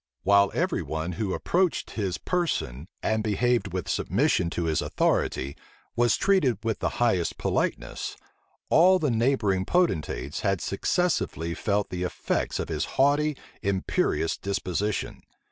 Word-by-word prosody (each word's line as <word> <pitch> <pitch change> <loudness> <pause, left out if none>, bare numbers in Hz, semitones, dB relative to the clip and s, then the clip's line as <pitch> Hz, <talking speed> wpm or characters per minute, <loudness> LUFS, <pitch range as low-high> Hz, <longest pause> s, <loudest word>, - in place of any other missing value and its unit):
While 100 +1 +5
every - - 0
one 80 +2 -3
who 95 +1 -2
approached 180 -1 0
his 95 -5 -2
person, 85 - -2 0.2
and 110 0 +1
behaved 120 +3 +1
with - - -3
submission 85 - +1
to 85 - -2
his 80 -2 +1
authority, 70 +2 0 0.4
was 120 0 +3
treated 185 - +3
with 110 -1 -1
the - - -2
highest 95 -8 +1
politeness, - - -2 0.5
all 185 +3 +6
the 150 -7 0
neighboring 115 -5 +2
potentates 95 - 0
had 95 -2 0
successively 100 - -1
felt 100 +2 -1
the 90 - -3
effects 90 - -1
of - - -2
his - - -1
haughty, 145 +2 +3 0.2
imperious 95 -4 0
disposition. 100 +1 -2
105 Hz, 130 wpm, -26 LUFS, 90-135 Hz, 0.5 s, all